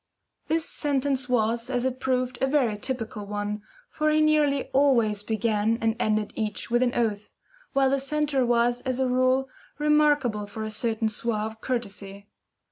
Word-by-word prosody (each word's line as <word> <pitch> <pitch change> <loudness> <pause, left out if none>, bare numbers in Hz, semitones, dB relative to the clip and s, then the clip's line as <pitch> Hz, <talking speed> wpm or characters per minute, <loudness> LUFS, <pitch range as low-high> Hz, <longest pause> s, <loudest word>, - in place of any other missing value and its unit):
This 320 +1 0
sentence 275 -3 -1
was, 230 0 +1
as 250 -1 0
it 260 0 -2
proved, 255 -1 -1
a 265 - +3
very 265 -6 +2
typical 225 -2 -4
one, 205 0 -3 0.3
for 305 0 0
he 305 0 +3
nearly 300 -3 +3
always 235 -7 +3
began 220 0 0
and 225 0 +1
ended 215 -2 0
each 220 +1 -4
with 240 +1 +3
an 250 -1 +1
oath, 210 -3 -1 0.4
while 270 -1 +3
the 275 - +2
centre 280 -1 0
was, 240 0 +2
as 260 -1 -2
a 260 - +2
rule, 255 +1 +2 0.3
remarkable 295 -8 +2
for 220 +2 -6
a 215 - -4
certain 225 +1 0
suave 220 0 -3
courtesy. 200 -5 -5
245 Hz, 160 wpm, -26 LUFS, 220-270 Hz, 0.4 s, a